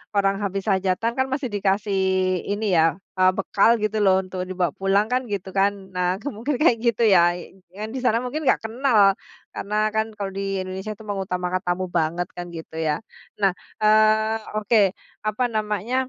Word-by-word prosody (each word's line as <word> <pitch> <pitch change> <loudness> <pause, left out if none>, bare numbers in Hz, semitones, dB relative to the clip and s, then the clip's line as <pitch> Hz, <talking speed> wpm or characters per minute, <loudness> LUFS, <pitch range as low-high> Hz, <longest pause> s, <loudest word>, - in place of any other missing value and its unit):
orang 195 -1 +2
habis 195 +1 -2
hajatan 190 +4 +1
kan, 260 - +2
masih 265 -3 -2
dikasih 200 0 0 0.5
ini 210 +2 -1
ya, 160 - +5 0.3
eee, 185 0 +5
bekal 195 +2 +3
gitu 215 0 0
loh 190 -1 +4
untuk 185 0 -5
dibawa 180 -2 0
pulang 195 +2 +2
kan, 255 +1 +2
gitu 190 -1 -4
kan. 195 +1 +2 0.2
Nah, 180 0 +1
ke - - -6
mungkin 250 +5 -3
kayak 240 -7 +5
gitu 235 0 +2
ya, 175 -2 +5 0.4
yang 215 +2 -5
di - - -2
sana 230 -2 +3
mungkin 295 +4 -4
nggak - - +3
kenal 220 -6 +3 0.3
karena 210 +2 -5 0.2
kan 220 0 +2
kalau 200 -2 -4
di 195 0 -3
Indonesia 190 +3 -5
itu 210 - -16
mengutamakan 185 -2 -2
tamu 180 +1 -1
banget 170 +1 0
kan, 175 - -4
gitu 160 0 -10
ya. 155 +3 -1 0.4
Nah, 195 -1 +4 0.3
eee, 215 +1 +4 0.2
oke 215 +1 +2 0.5
apa 215 +4 0
namanya, 215 +2 -2
200 Hz, 175 wpm, -23 LUFS, 185-220 Hz, 0.5 s, ya